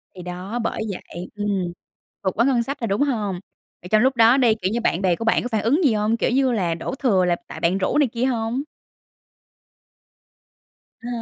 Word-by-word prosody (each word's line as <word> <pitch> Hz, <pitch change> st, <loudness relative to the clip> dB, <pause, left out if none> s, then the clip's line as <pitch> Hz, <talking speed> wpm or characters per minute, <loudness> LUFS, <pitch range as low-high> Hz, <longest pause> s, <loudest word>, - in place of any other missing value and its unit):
Thì 180 Hz, -, -8 dB
đó, 180 Hz, +6 st, -5 dB
bởi -, -, -2 dB
vậy. 180 Hz, -1 st, -8 dB
Ừm. 200 Hz, -4 st, -1 dB, 0.5 s
Vượt 190 Hz, -, +1 dB
quá 235 Hz, -, +5 dB
ngân 255 Hz, -3 st, +2 dB
sách 275 Hz, +4 st, -5 dB
rồi, 230 Hz, -, -2 dB
đúng 200 Hz, +4 st, 0 dB
hông? 215 Hz, -10 st, 0 dB, 0.4 s
Vậy 180 Hz, -, -10 dB
trong 215 Hz, +1 st, +4 dB
lúc 260 Hz, +2 st, +3 dB
đó 230 Hz, +2 st, +6 dB
đi, 240 Hz, -5 st, +4 dB
kiểu 185 Hz, +1 st, 0 dB
như, 235 Hz, +2 st, -1 dB
bạn 185 Hz, -5 st, 0 dB
bè 185 Hz, -3 st, +2 dB
của 230 Hz, -, -5 dB
bạn 230 Hz, -, +2 dB
có -, -, -2 dB
phản 220 Hz, -2 st, +1 dB
ứng 280 Hz, +10 st, +2 dB
gì 270 Hz, -7 st, +4 dB
hông? 215 Hz, +2 st, +1 dB
Kiểu -, -, 0 dB
như 260 Hz, 0 st, +2 dB
là 180 Hz, -8 st, 0 dB
đổ 170 Hz, +10 st, -5 dB
thừa 205 Hz, -10 st, +2 dB
là 175 Hz, -1 st, +2 dB
tại -, -, -8 dB
bạn 175 Hz, +3 st, +1 dB
rủ 190 Hz, -, 0 dB
này 295 Hz, -2 st, +4 dB
kia 235 Hz, +2 st, -2 dB
hông? 240 Hz, +1 st, -1 dB, 2.4 s
À 235 Hz, -, -8 dB
225 Hz, 220 wpm, -22 LUFS, 190-245 Hz, 2.4 s, đó